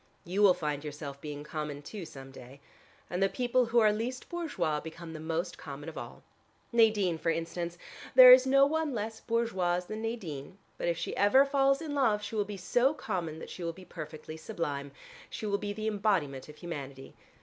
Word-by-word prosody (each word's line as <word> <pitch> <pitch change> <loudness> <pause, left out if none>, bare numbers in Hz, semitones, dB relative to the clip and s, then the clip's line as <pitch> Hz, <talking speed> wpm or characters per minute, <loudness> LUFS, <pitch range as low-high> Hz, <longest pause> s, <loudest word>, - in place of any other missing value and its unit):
You 185 +4 -1
will 195 -3 +7
find 150 -2 -3
yourself 145 -2 -7
being 145 -1 -6
common 150 -2 -5
too, 190 +4 -7
some 135 -1 -11
day. 135 +1 -12 0.5
And 180 +2 -3
the 195 - +4
people 250 +1 +1
who 235 +1 0
are 215 -2 +6
least 240 +4 -4
bourgeois 310 - -1
become 165 +1 -9
the 155 - -7
most 165 +3 -3
common 145 +1 -7
of 160 - -11
all. - - -8 0.5
Nadine, 215 -7 +3
for 165 - 0
instance: 170 +1 -3 0.4
there 255 -1 +12
is 255 +1 +6
no 275 +1 +6
one 310 -2 0
less 220 +1 -4
bourgeoise 190 -7 0
than 215 +3 -5
Nadine, 190 -8 -5 0.2
but - - -1
if 170 -1 +1
she - - -3
ever 235 +8 +5
falls 275 +1 +2
in 300 -2 -4
love 225 -7 +2
she - - -6
will 210 -2 +1
be 205 0 -6
so 245 +10 +2
common 165 - -3
that - - -9
she 180 - -7
will 165 0 -2
be 185 +2 -13
perfectly 155 -1 -8
sublime. 150 -6 -4 0.4
She - - -6
will 200 -1 0
be 205 - -3
the 215 +1 -5
embodiment 190 -11 0
of 150 - -11
humanity. 140 -6 -7
180 Hz, 200 wpm, -30 LUFS, 155-225 Hz, 0.5 s, there